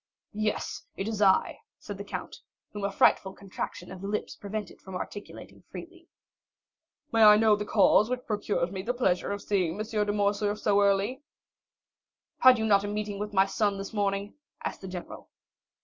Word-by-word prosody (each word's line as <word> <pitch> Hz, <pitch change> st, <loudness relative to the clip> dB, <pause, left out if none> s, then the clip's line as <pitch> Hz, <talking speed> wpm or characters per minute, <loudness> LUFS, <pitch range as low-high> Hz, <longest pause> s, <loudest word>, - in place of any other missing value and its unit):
"Yes, 215 Hz, 0 st, -2 dB
it 195 Hz, -, -3 dB
is 220 Hz, -2 st, -3 dB
I," 190 Hz, -2 st, +3 dB, 0.2 s
said -, -, -8 dB
the -, -, -4 dB
count, -, -, -7 dB, 0.4 s
whom 205 Hz, -1 st, -6 dB
a 200 Hz, -, -1 dB
frightful 190 Hz, 0 st, +3 dB
contraction 190 Hz, -2 st, -7 dB
of 185 Hz, -1 st, -9 dB
the 195 Hz, -, -5 dB
lips 210 Hz, +1 st, -3 dB
prevented 205 Hz, -1 st, -6 dB
from 190 Hz, -1 st, -9 dB
articulating 205 Hz, +2 st, -8 dB
freely. 345 Hz, 0 st, -11 dB, 1.0 s
"May 225 Hz, -, +2 dB
I 210 Hz, 0 st, +9 dB
know 215 Hz, -1 st, +5 dB
the 210 Hz, 0 st, -5 dB
cause 210 Hz, +1 st, +4 dB
which 250 Hz, 0 st, -3 dB
procures 205 Hz, -4 st, -1 dB
me 190 Hz, -1 st, -4 dB
the 240 Hz, +6 st, -2 dB
pleasure 190 Hz, -7 st, 0 dB
of 200 Hz, 0 st, -4 dB
seeing 185 Hz, -5 st, 0 dB
M. 215 Hz, -, -2 dB
de 210 Hz, -2 st, -1 dB
Morcerf 205 Hz, 0 st, 0 dB
so 205 Hz, -1 st, +2 dB
early?" 200 Hz, +6 st, +1 dB, 1.2 s
"Had 255 Hz, -1 st, +7 dB
you 220 Hz, -, -1 dB
not 200 Hz, -2 st, +4 dB
a -, -, -3 dB
meeting 205 Hz, -1 st, -4 dB
with 210 Hz, 0 st, -4 dB
my 190 Hz, -1 st, +4 dB
son 200 Hz, 0 st, 0 dB
this 195 Hz, +3 st, -7 dB
morning?" 200 Hz, 0 st, -1 dB, 0.3 s
asked -, -, -4 dB
the 190 Hz, -, -7 dB
general. 180 Hz, -1 st, -8 dB
205 Hz, 180 wpm, -28 LUFS, 195-215 Hz, 1.2 s, I